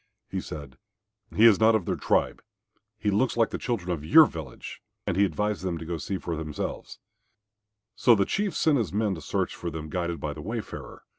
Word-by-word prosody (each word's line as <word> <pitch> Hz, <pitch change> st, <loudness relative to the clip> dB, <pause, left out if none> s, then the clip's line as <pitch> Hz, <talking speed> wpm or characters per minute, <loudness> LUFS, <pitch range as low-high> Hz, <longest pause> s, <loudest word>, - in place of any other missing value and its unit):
He -, -, -2 dB
said, 70 Hz, -4 st, -9 dB, 0.5 s
"He 110 Hz, -, +4 dB
is 110 Hz, -4 st, +7 dB
not 110 Hz, 0 st, +5 dB
of 105 Hz, -6 st, 0 dB
their -, -, 0 dB
tribe. -, -, 0 dB, 0.6 s
He 105 Hz, -2 st, 0 dB
looks 115 Hz, +5 st, +1 dB
like 115 Hz, -1 st, +3 dB
the -, -, -3 dB
children 100 Hz, -8 st, -2 dB
of 80 Hz, -4 st, -3 dB
your 155 Hz, -, +8 dB
village," 80 Hz, -, -8 dB, 0.2 s
and -, -, -1 dB
he 100 Hz, -, +4 dB
advised 105 Hz, +1 st, -1 dB
them 90 Hz, -2 st, -2 dB
to 80 Hz, -, -7 dB
go 85 Hz, 0 st, -3 dB
to -, -, -10 dB
see 95 Hz, +7 st, -3 dB
him -, -, -5 dB
for 85 Hz, -, -3 dB
themselves. 75 Hz, -1 st, -5 dB, 1.0 s
So 120 Hz, -, +5 dB
the 100 Hz, -2 st, +2 dB
Chief 200 Hz, -, -1 dB
sent 150 Hz, -4 st, +3 dB
his 105 Hz, -8 st, -1 dB
men 105 Hz, 0 st, +1 dB
to 80 Hz, -, -7 dB
search -, -, -1 dB
for -, -, -4 dB
them 80 Hz, 0 st, -6 dB
guided 85 Hz, -2 st, -2 dB
by 75 Hz, -, -3 dB
the 75 Hz, -, -8 dB
wayfarer. 110 Hz, +5 st, -6 dB
95 Hz, 220 wpm, -27 LUFS, 80-110 Hz, 1.0 s, your